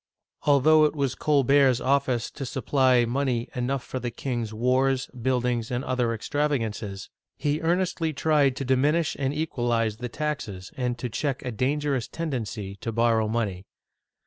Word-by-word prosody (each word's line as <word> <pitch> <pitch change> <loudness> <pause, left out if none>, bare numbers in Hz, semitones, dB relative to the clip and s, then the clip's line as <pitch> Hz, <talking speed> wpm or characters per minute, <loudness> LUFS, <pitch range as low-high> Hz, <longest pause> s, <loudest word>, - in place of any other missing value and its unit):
Although 155 +2 +6
it 150 - 0
was 140 -3 0
Colbert's 140 -2 +3
office 130 -3 +1
to 140 - -7
supply 130 -2 +2
money 125 -1 -1
enough 125 +1 -2
for 130 - -5
the 120 - -3
king's 120 -2 -3
wars, 130 +3 +1
buildings, 125 -2 -1
and 125 +1 -2
other 125 -3 0
extravagances, 115 -6 -2 0.3
he 150 +2 -1
earnestly 170 -1 0
tried 145 -3 +2
to 135 - -4
dipiinish 145 +6 +2
and 135 -1 0
equalize 120 -8 -1
the 125 +1 -5
taxes, 120 -11 -4
and 125 -2 -2
to 125 - -3
check 135 +3 -2
a 125 - -2
dangerous 135 +2 0
tendency 110 -11 -4
to 115 - -4
borrow 115 -1 +2
money. 105 -5 -2
130 Hz, 145 wpm, -26 LUFS, 120-145 Hz, 0.3 s, Although